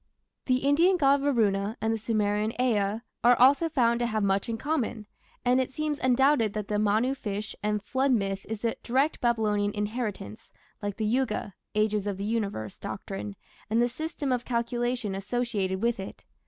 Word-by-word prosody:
The 255 +1 +2
Indian 340 +6 +4
god 280 -3 +4
Varuna 215 -6 +1
and 225 0 0
the - - -1
Sumerian 215 0 0
Ea 215 -3 +1 0.2
are 245 +1 +7
also 280 +6 +5
found 235 -6 +2
to 240 - +1
have 215 -2 -1
much 195 +2 +1
in 225 - -2
common, 245 -6 -2 0.4
and 250 +1 +4
it 260 - -3
seems 300 0 -2
undoubted 260 -3 +3
that 210 -2 -4
the 210 -1 +1
Manu 215 +5 +2
fish 210 -5 -5
and 210 -1 -1
flood 265 +5 +1
myth 195 -4 0
is 220 +1 -4
a 230 - +1
direct 270 +6 +1
Babylonian 215 -4 +1
inheritance, 210 - -4 0.3
like 205 -1 -3
the 220 - -1
Yuga 220 -3 0 0.2
(Ages 210 -1 +1
of 200 -2 -2
the 200 - -4
Universe) 200 - -3
doctrine 100 +1 -6 0.3
and 225 +2 +2
the 240 - +4
system 305 +1 -4
of 245 -1 0
calculation 240 -2 -1
associated 195 -2 -2
with 235 -3 +1
it. 195 - -8
225 Hz, 175 wpm, -28 LUFS, 205-255 Hz, 0.4 s, are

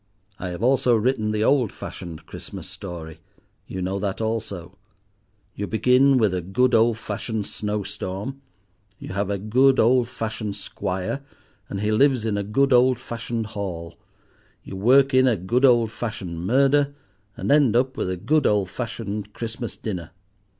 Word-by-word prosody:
I 90 - -4
have 90 +4 -5
also 125 -1 +4
written 110 -1 +1
the 105 0 0
old 130 -4 +3
fashioned 80 -2 -8
Christmas - - -9
story—you 85 +2 -9
know 95 +2 -2
that 100 -1 -2
also: 105 -5 -3 0.8
you 100 - -4
begin 130 +4 +4
with 110 -6 +3
a 90 - -1
good 120 +9 +1
old 115 0 +4
fashioned 110 0 -4
snowstorm; 105 +5 -4 0.6
you - - -9
have 100 +1 -2
a 100 - 0
good 130 +7 +3
old 120 +1 +4
fashioned 110 -4 -4
squire, 95 +4 -3 0.5
and 100 - -4
he 105 +1 +1
lives 130 0 +3
in 110 -2 0
a 100 - 0
good 135 +7 +2
old 125 0 +5
fashioned 115 -1 -4
Hall; 95 -6 -5 0.7
you - - -8
work 130 +7 +4
in 130 0 +5
a 120 -4 +3
good 120 +9 +2
old 120 -4 +4
fashioned 95 -8 -5
murder; 140 +4 +3 0.4
and - - -1
end 140 -6 +5
up 130 +2 +2
with 95 - -2
a 90 - -2
good 145 - +2
old 100 -3 +1
fashioned 105 -4 -5
Christmas 115 +1 -5
dinner. 90 -7 -5
110 Hz, 155 wpm, -24 LUFS, 100-125 Hz, 0.8 s, old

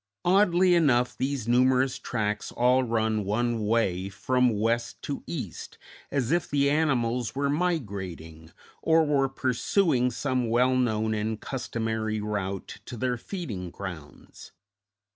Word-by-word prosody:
Oddly 185 -1 +4
enough 130 -8 +3
these 135 -3 -2
numerous 130 +2 +3
tracks 105 -3 -2
all 125 +2 +3
run 110 -2 0
one 110 +2 -1
way, 95 -5 +1
from 125 +6 +1
west 115 +2 0
to 140 - -4
east, 125 - -6 0.3
as 135 -2 -1
if 175 0 +1
the 140 0 +2
animals 125 -6 0
were 140 +1 0
migrating, 95 - -3 0.3
or 160 0 +4
were 140 -2 +2
pursuing 130 - +1
some 125 -1 -1
well 125 +3 +3
known 110 -3 +1
and 110 0 -2
customary 110 -4 -3
route 100 -2 -4
to 120 - -7
their 125 +2 0
feeding 115 - -6
grounds. 85 -5 -10
120 Hz, 125 wpm, -27 LUFS, 110-135 Hz, 0.3 s, Oddly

